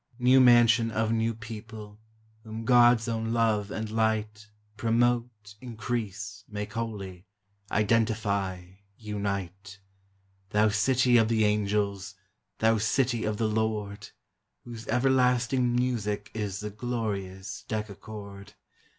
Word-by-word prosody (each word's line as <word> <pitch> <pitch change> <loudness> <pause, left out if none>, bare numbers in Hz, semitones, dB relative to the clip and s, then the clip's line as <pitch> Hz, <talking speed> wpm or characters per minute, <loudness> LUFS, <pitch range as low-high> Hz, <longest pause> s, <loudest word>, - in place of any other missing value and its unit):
New 130 +1 +5
mansion 120 -2 +6
of 110 0 0
new 115 0 0
people, 110 -1 -9 0.4
Whom 110 0 -7
God's 120 -1 +5
own 115 0 -2
love 110 -3 +1
and 110 +1 -4
light 110 -1 -1 0.3
Promote, 115 -2 0
increase, 110 -4 -5
make 105 0 -6
holy, 100 -5 -5 0.4
Identify, 100 -4 0 0.3
unite! 100 -2 -5 0.7
Thou 105 +2 +3
City 125 +3 +3
of 115 -1 +4
the 110 -1 +2
Angels! 100 -2 -1 0.4
Thou 110 0 +3
City 120 +1 +1
of 105 -1 -1
the 110 - +1
Lord! 105 -1 -2 0.5
Whose 115 -2 -9
everlasting 125 0 +2
music 105 -5 -1
Is 105 -2 -4
the 105 0 -5
glorious 100 -4 -4
decachord! 105 -2 -7
110 Hz, 105 wpm, -28 LUFS, 105-115 Hz, 0.7 s, mansion